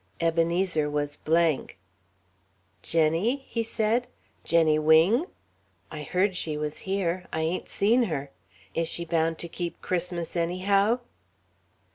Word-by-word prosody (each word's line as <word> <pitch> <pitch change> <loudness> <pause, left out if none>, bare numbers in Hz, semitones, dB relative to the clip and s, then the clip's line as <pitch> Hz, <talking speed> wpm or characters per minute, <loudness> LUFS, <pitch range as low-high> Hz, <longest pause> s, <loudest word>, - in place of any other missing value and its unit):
Ebenezer 165 -1 +1
was 145 0 -2
blank. 160 - +1 1.0
"Jenny?" 170 - +1
he 230 - -2
said. 225 +2 0 0.4
"Jenny 160 -2 +3
Wing? 165 - +4 0.6
I 155 - -6
heard 185 +6 0
she 155 -3 -2
was 150 0 -3
here. 185 -2 -1
I 160 - -1
ain't 165 +3 -2
seen 235 +5 +3
her. 140 -7 -4 0.4
Is 165 0 0
she 170 - -4
bound 165 -1 0
to 170 - -5
keep 170 0 -5
Christmas 175 -2 -3
anyhow?" 195 +7 +2
170 Hz, 120 wpm, -27 LUFS, 160-195 Hz, 1.0 s, Wing